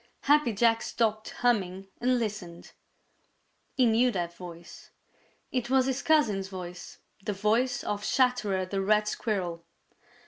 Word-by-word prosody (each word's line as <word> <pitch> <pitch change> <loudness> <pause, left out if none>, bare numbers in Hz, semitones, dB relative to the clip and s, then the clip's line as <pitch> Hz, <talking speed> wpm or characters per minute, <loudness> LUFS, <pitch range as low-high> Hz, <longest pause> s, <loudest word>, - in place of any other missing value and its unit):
Happy 290 -3 +4
Jack 225 +2 +3
stopped 215 -2 -1
humming 195 -6 0
and 250 +1 +2
listened. 205 -7 -5 1.0
He 255 - +4
knew 235 +2 +4
that 175 -6 -3
voice. 175 -1 -11 0.6
It 250 -2 -2
was 260 -1 +4
his 265 0 -1
cousin's 220 -12 +2
voice 180 -2 -8 0.3
the 210 - -2
voice 220 +6 +1
of 205 0 -3
Chatterer 215 -9 +1
the 195 +1 -2
Red 210 +2 +2
Squirrel. 180 -6 -2
210 Hz, 130 wpm, -28 LUFS, 190-245 Hz, 1.0 s, Happy